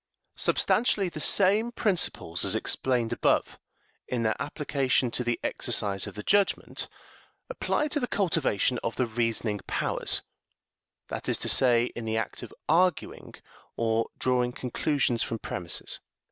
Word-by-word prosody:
Substantially 205 Hz, -5 st, +2 dB
the 155 Hz, -, -7 dB
same 205 Hz, +8 st, +4 dB
principles 180 Hz, -, 0 dB
as -, -, +3 dB
explained 125 Hz, -3 st, +1 dB
above, -, -, +1 dB, 0.5 s
in 120 Hz, -2 st, -1 dB
their 110 Hz, -1 st, +1 dB
application 135 Hz, -4 st, 0 dB
to 125 Hz, -, 0 dB
the 120 Hz, -1 st, -1 dB
exercise 100 Hz, -2 st, 0 dB
of -, -, -9 dB
the 105 Hz, -, -6 dB
judgment, 200 Hz, -1 st, +1 dB, 0.6 s
apply 300 Hz, -10 st, -1 dB
to 295 Hz, -, 0 dB
the 250 Hz, -, -2 dB
cultivation 155 Hz, -, 0 dB
of 115 Hz, -, -3 dB
the 125 Hz, -, +1 dB
reasoning 115 Hz, -2 st, -1 dB
powers -, -, 0 dB, 0.9 s
that -, -, -3 dB
is -, -, +2 dB
to -, -, +1 dB
say, 120 Hz, -2 st, +4 dB
in 120 Hz, -, -5 dB
the 110 Hz, 0 st, -1 dB
act 110 Hz, -, -3 dB
of -, -, -9 dB, 0.2 s
arguing, 175 Hz, +1 st, +1 dB, 0.4 s
or 115 Hz, 0 st, +1 dB
drawing 125 Hz, -1 st, +1 dB
conclusions 130 Hz, -1 st, 0 dB
from 115 Hz, -, -2 dB
premises. 85 Hz, -6 st, -3 dB
125 Hz, 140 wpm, -27 LUFS, 115-170 Hz, 0.9 s, same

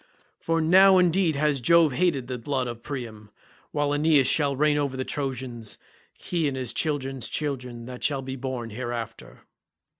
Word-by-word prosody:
For 165 Hz, 0 st, 0 dB
now 190 Hz, +4 st, +6 dB
indeed 180 Hz, -2 st, +3 dB
has 145 Hz, -2 st, +1 dB
Jove 165 Hz, +3 st, +5 dB
hated 150 Hz, -3 st, +1 dB
the 125 Hz, 0 st, -5 dB
blood 130 Hz, +2 st, -1 dB
of 120 Hz, -1 st, -6 dB
Priam, 115 Hz, -6 st, -7 dB, 0.4 s
while 145 Hz, -1 st, 0 dB
Aeneas 145 Hz, -2 st, +4 dB
shall 140 Hz, +1 st, +2 dB
reign 150 Hz, +2 st, +2 dB
over 140 Hz, -3 st, -1 dB
the 130 Hz, -, -2 dB
Trojans, 130 Hz, -5 st, -4 dB, 0.4 s
he 170 Hz, -4 st, -1 dB
and 135 Hz, -2 st, -3 dB
his 125 Hz, -3 st, -3 dB
children's 135 Hz, -4 st, -2 dB
children 125 Hz, -5 st, -3 dB
that 125 Hz, 0 st, -9 dB
shall 140 Hz, -3 st, 0 dB
be 130 Hz, 0 st, -5 dB
born 125 Hz, -3 st, -5 dB
hereafter." 115 Hz, -, -6 dB
135 Hz, 160 wpm, -25 LUFS, 125-150 Hz, 0.4 s, now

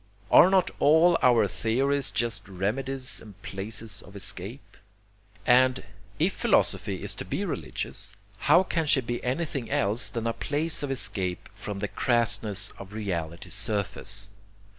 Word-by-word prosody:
Are 180 Hz, -, +8 dB
not 190 Hz, -1 st, +3 dB
all 160 Hz, +4 st, +5 dB
our 120 Hz, -4 st, +5 dB
theories 135 Hz, +7 st, 0 dB
just 115 Hz, -3 st, -2 dB
remedies 130 Hz, +8 st, -1 dB
and 100 Hz, -3 st, -14 dB
places 105 Hz, +1 st, -4 dB
of 100 Hz, -, -15 dB
escape? 100 Hz, +6 st, -4 dB, 0.7 s
And, 130 Hz, +1 st, +4 dB, 0.3 s
if 175 Hz, +5 st, +2 dB
philosophy -, -, +1 dB
is -, -, -3 dB
to -, -, -6 dB
be -, -, -3 dB
religious, -, -, -5 dB, 0.3 s
how -, -, +7 dB
can 165 Hz, -4 st, -1 dB
she 140 Hz, -2 st, +4 dB
be 120 Hz, 0 st, -4 dB
anything 135 Hz, -1 st, -2 dB
else 105 Hz, +5 st, +1 dB
than 115 Hz, -2 st, -4 dB
a 115 Hz, -, 0 dB
place 150 Hz, +5 st, -1 dB
of 145 Hz, -, -3 dB
escape 95 Hz, -9 st, -1 dB
from 105 Hz, -1 st, -6 dB
the 105 Hz, +1 st, -2 dB
crassness 110 Hz, -5 st, +1 dB
of 100 Hz, +1 st, -10 dB
reality's 90 Hz, -4 st, -4 dB
surface? 105 Hz, -1 st, 0 dB
115 Hz, 140 wpm, -27 LUFS, 100-135 Hz, 0.7 s, Are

